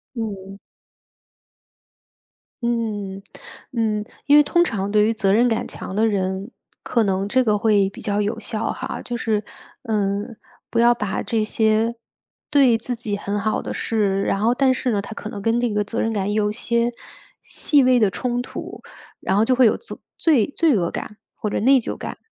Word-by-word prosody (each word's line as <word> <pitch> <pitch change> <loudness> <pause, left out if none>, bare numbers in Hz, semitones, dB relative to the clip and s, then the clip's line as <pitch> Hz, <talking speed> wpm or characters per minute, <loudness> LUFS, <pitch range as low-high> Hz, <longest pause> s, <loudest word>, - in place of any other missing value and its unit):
嗯。 200 -4 -5 2.1
嗯， 210 -5 -2 0.5
嗯。 220 -3 0 0.2
因 290 - +5
为 295 - +9
通 345 +4 +3
常 200 - -2
对 210 0 +4
于 225 - +2
责 200 -3 +1
任 235 +4 +4
感 225 -2 -1
强 190 - -7
的 225 +1 +3
人， 190 +1 -2 0.3
可 235 - +1
能 195 -1 0
这 255 +5 +2
个 210 -2 +2
会 205 -2 +3
比 - - -12
较 205 0 -1
有 205 +2 -2
效 220 -1 -3
哈。 260 - -5
就 245 - -4
是， 215 -3 -1 0.4
呃， 205 -3 0 0.5
不 230 - 0
要 240 +1 +6
把 205 -3 -2
这 225 -2 0
些， 220 +1 +1 0.5
对 270 -6 +5
自 240 +2 -4
己 220 -3 -3
很 205 0 -3
好 215 +1 0
的 - - -5
事， 200 -3 0
然 195 - 0
后 235 +3 +3
但 265 -1 +3
是 255 -1 -1
呢， 205 -2 0
他 200 - -8
可 215 - -7
能 205 -3 -7
跟 225 +3 +1
这 240 - +1
个 210 0 0
责 210 - -4
任 225 - 0
感 205 -1 -1
有 210 -1 +1
些 235 +1 0 0.5
细 285 -3 +2
微 255 -1 +4
的 210 -3 +4
冲 245 +4 -2
突， 245 - -8 0.4
然 195 - 0
后 220 - +4
就 255 - +3
会 255 - +5
有 - - +2
责 465 - -10 0.2
罪 285 -10 +3
罪 320 -6 +3
恶 175 -4 +1
感 210 - -6 0.2
或 210 - -3
者 - - 0
内 265 +5 +5
疚 230 - -4
感。 - - -7
220 Hz, 205 characters per minute, -22 LUFS, 205-240 Hz, 2.1 s, 为